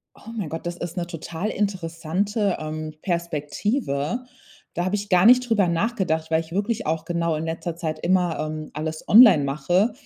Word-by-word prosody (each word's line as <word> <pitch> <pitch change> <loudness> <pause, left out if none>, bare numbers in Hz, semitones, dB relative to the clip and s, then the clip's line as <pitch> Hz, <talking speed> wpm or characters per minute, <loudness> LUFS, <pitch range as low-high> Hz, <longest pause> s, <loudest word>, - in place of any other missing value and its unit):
Oh 225 - -12
mein 195 -8 -3
Gott, 165 +2 -6
das 175 0 -3
ist 175 -1 -6
'ne 175 -1 -2
total 170 +3 -5
interessante, 195 +1 -1
ähm, 155 0 -5
Perspektive. 170 - -2 0.5
Da 175 - -1
habe 185 - -1
ich 205 0 -5
gar 180 +1 +5
nicht 250 0 +6
drüber 210 -4 +3
nachgedacht, 170 -4 -1
weil 160 0 +3
ich 165 0 -10
wirklich 205 +4 -1
auch 160 0 -1
genau 170 -1 -1
in 155 - -3
letzter 165 +1 -4
Zeit 160 -2 -3
immer, 180 -1 +1
ähm, 155 0 -4
alles 155 +1 -5
online 205 - +8
mache. 175 - +1
170 Hz, 180 wpm, -24 LUFS, 160-200 Hz, 0.5 s, online